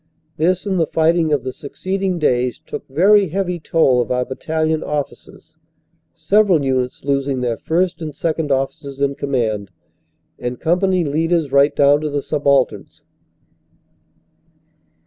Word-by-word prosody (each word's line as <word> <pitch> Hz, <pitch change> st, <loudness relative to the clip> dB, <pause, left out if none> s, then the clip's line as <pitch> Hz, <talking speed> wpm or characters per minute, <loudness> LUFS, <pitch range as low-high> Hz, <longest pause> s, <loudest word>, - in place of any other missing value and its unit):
This 180 Hz, +4 st, +1 dB
and 190 Hz, -3 st, 0 dB
the 165 Hz, -, +2 dB
fighting 160 Hz, 0 st, +2 dB
of 145 Hz, -4 st, +1 dB
the 130 Hz, -1 st, -4 dB
succeeding 190 Hz, +5 st, -3 dB
days 125 Hz, -6 st, +1 dB
took -, -, -8 dB
very 195 Hz, +8 st, +4 dB
heavy 180 Hz, +1 st, -2 dB
toll 145 Hz, -5 st, +2 dB
of 120 Hz, -, -4 dB
our 125 Hz, 0 st, 0 dB
battalion 155 Hz, +4 st, -2 dB
officers, 150 Hz, -1 st, -6 dB, 0.6 s
several 195 Hz, -8 st, +2 dB
units 130 Hz, -1 st, -1 dB
losing 140 Hz, -1 st, -1 dB
their 120 Hz, -2 st, -1 dB
first 175 Hz, +2 st, -1 dB
and 155 Hz, -1 st, -4 dB
second 160 Hz, -2 st, -2 dB
officers 135 Hz, +1 st, -2 dB
in 140 Hz, 0 st, +1 dB
command, 115 Hz, -8 st, -2 dB, 0.7 s
and 125 Hz, 0 st, -4 dB
company 180 Hz, +2 st, +1 dB
leaders 160 Hz, 0 st, 0 dB
right 140 Hz, +1 st, +4 dB
down 145 Hz, +1 st, +4 dB
to 155 Hz, -, -2 dB
the 145 Hz, -1 st, -2 dB
subalterns. 140 Hz, -3 st, 0 dB
150 Hz, 135 wpm, -19 LUFS, 135-170 Hz, 0.7 s, very